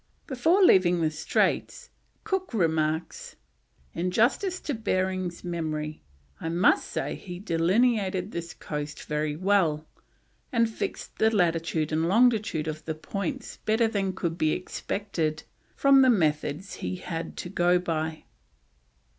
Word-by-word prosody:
Before 325 +9 +3
leaving 180 - +5
the 155 -1 +1
straits, 485 - -1 0.3
Cook 380 - -2
remarks: 160 -3 -1 0.6
"In 180 +2 -1
justice 280 - +1
to 290 - -3
Behring's 185 -5 -1
memory, 155 -3 -3 0.4
I 165 - -3
must 175 +4 +3
say - - -3
he 180 -3 -8
delineated 190 +2 +1
this 170 -1 -6
coast 150 -1 -5
very 150 0 -2
well, 170 -4 +2 0.7
and 230 -3 +3
fixed 220 - -5
the 220 - +5
latitude 165 -6 0
and 160 +1 +1
longitude 215 -6 +3
of 155 0 -4
the 160 - -3
points 200 - -5
better 225 +1 +2
than 195 -3 -1
could 170 -2 -3
be 155 0 +2
expected 165 -5 -3 0.3
from 275 -1 +6
the 260 - +6
methods 155 -3 0
he - - -3
had 165 -2 -6
to 175 - -5
go 175 -1 +3
by." 160 -3 -3
180 Hz, 130 wpm, -27 LUFS, 160-220 Hz, 0.7 s, from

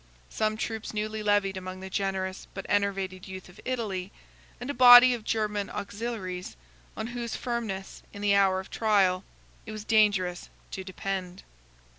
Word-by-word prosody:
Some 215 0 0
troops 220 -1 -4
newly 215 +1 -2
levied 205 -2 +2
among 185 0 -6
the 190 - -7
generous 190 -1 -2
but 195 - -6
enervated 195 -2 -1
youth 190 -1 -8
of 180 - -16
Italy; 205 -7 -3 0.5
and 245 - -6
a 285 - -2
body 245 0 +9
of 235 -3 -5
German 210 -2 -1
auxiliaries, 200 - -5 0.4
on - - -3
whose 235 -1 -4
firmness, 225 -6 -4
in 205 - -8
the 205 -1 +4
hour 195 -1 +4
of 190 - -9
trial, 195 -4 +2 0.4
it - - -5
was 215 -1 -7
dangerous 200 -5 +2 0.2
to 190 - -5
depend. 185 -1 -5
200 Hz, 155 wpm, -28 LUFS, 190-220 Hz, 0.5 s, body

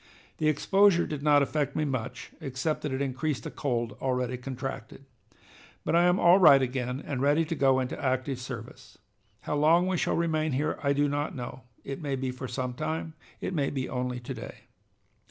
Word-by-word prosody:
The 155 - +1
exposure 185 +4 +4
did 150 -2 -5
not 145 -1 +5
affect 145 0 -1
me 155 - +1
much, 125 -2 -4
except 135 +4 -2
that 150 - -3
it 130 +1 -1
increased 140 +2 -2
a - - -4
cold 120 -5 -2
already 125 -1 0
contracted. 130 0 -6 0.8
But - - +1
I 170 +1 +5
am 180 +2 +3
'all 175 +3 +6
right' 150 -7 +8
again 125 +1 -3
and 135 -3 -3
ready 145 +4 +3
to 165 - -3
go 135 -3 +3
into 130 +2 -4
active 130 0 0
service. 125 - -9 0.4
How - - -2
long 160 +4 +4
we 185 -1 0
shall - - 0
remain 155 -3 0
here 145 +4 -1
I 140 -1 +2
do 145 +1 +2
not 145 +1 -2
know. 125 -1 -7 0.2
It 135 +3 -6
may 140 -3 -1
be 130 -1 -2
for 130 +1 -6
some 125 0 -3
time, 160 +5 -3 0.3
it - - -3
may 145 -5 +1
be 130 -2 -3
only 125 -1 -3
to 120 - -6
day." - - -8
140 Hz, 195 wpm, -28 LUFS, 130-155 Hz, 0.8 s, right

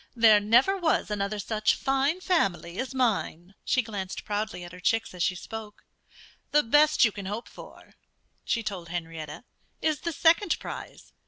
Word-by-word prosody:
There 225 -3 +6
never 235 - +4
was 325 - 0
another 205 0 -2
such 215 +1 +1
fine 275 +6 0
family 195 - 0
as 265 +1 -4
mine." 200 -7 -1
She 255 - +1
glanced 195 -4 -6
proudly 205 -3 -3
at 175 - -9
her 180 - -11
chicks 225 +3 0
as 180 - -7
she 180 +1 +1
spoke. 215 +2 -9 0.6
"The 295 - +4
best 295 +4 +5
you 215 - +2
can 200 -2 -7
hope 210 +4 -5
for," - - -14 0.5
she 230 -2 -1
told 185 -5 -5
Henrietta, 165 -2 -6 0.4
"is 310 -3 0
the 335 - -3
second 335 +4 +3
prize. - - -9
215 Hz, 165 wpm, -27 LUFS, 190-265 Hz, 0.6 s, There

